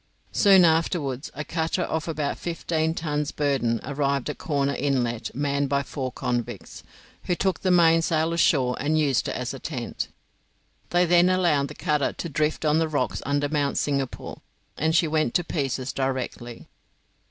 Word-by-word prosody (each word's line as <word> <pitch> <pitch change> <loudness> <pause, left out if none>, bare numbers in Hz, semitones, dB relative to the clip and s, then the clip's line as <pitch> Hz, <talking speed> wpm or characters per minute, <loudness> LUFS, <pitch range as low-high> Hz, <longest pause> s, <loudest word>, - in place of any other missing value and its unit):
Soon 195 -4 +6
afterwards 160 -4 0
a 150 - -4
cutter 165 +2 -1
of 160 0 -2
about 150 -3 -2
fifteen 165 -1 -1
tons 150 -3 -2
burden 135 -6 0
arrived 140 0 -1
at - - -11
Corner 140 -3 0
Inlet 120 -5 -1
manned 140 0 0
by 140 0 +1
four 130 -1 -4
convicts, 120 -6 -4 0.4
who 180 - +1
took 190 -1 0
the 185 - 0
mainsail 165 -2 +3
ashore 130 -7 +3
and 155 +3 +1
used 145 -5 +1
it - - -3
as - - -3
a - - -7
tent. - - -4 0.8
They 175 0 +3
then 175 +1 +5
allowed 170 -7 +2
the - - -10
cutter 150 -2 0
to 170 - -5
drift 150 +1 -1
on 155 +1 +3
the 165 - +1
rocks 150 - -1
under 145 0 +1
Mount 145 -2 0
Singapore, 140 -3 -2 0.3
and 160 +2 0
she 165 - +4
went 155 -5 0
to 175 - +3
pieces 135 -5 -2
directly. 130 -3 -4
150 Hz, 165 wpm, -25 LUFS, 140-165 Hz, 0.8 s, Soon